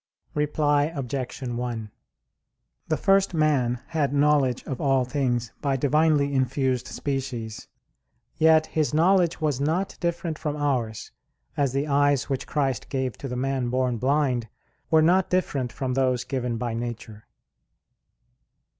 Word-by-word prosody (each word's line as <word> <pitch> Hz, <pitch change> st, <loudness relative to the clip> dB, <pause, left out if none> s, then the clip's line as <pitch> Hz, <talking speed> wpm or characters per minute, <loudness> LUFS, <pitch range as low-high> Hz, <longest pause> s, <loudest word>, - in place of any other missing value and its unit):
Reply 150 Hz, -1 st, +2 dB
Obj. 135 Hz, -1 st, -4 dB
1: 120 Hz, -3 st, -4 dB, 1.0 s
The 155 Hz, -, 0 dB
first 195 Hz, +2 st, +3 dB
man 130 Hz, -6 st, +1 dB
had 150 Hz, -5 st, 0 dB
knowledge 140 Hz, -3 st, +3 dB
of 130 Hz, -, -5 dB
all 135 Hz, -2 st, +2 dB
things 125 Hz, -3 st, -1 dB
by 140 Hz, -2 st, +1 dB
divinely 145 Hz, +1 st, +2 dB
infused 130 Hz, -1 st, 0 dB
species. 130 Hz, -6 st, -4 dB, 0.7 s
Yet 160 Hz, 0 st, +5 dB
his 155 Hz, -1 st, -1 dB
knowledge 175 Hz, +1 st, +3 dB
was 150 Hz, -4 st, 0 dB
not 170 Hz, +7 st, 0 dB
different 170 Hz, -2 st, -2 dB
from 150 Hz, -2 st, -2 dB
ours; 125 Hz, -7 st, -2 dB, 0.4 s
as 140 Hz, -3 st, 0 dB
the 140 Hz, +1 st, 0 dB
eyes 145 Hz, -1 st, +2 dB
which 135 Hz, 0 st, -2 dB
Christ 135 Hz, -5 st, -1 dB
gave 130 Hz, -3 st, -2 dB
to 140 Hz, -, -5 dB
the 125 Hz, -1 st, -4 dB
man 130 Hz, -1 st, -1 dB
born 125 Hz, -1 st, 0 dB
blind 130 Hz, -2 st, +1 dB, 0.4 s
were 160 Hz, -1 st, +5 dB
not 180 Hz, +3 st, +3 dB
different 140 Hz, -9 st, 0 dB
from 130 Hz, +1 st, -3 dB
those 130 Hz, -2 st, +1 dB
given 125 Hz, -3 st, -2 dB
by 120 Hz, 0 st, -3 dB
nature. 115 Hz, -2 st, -6 dB
135 Hz, 135 wpm, -25 LUFS, 125-150 Hz, 1.0 s, Yet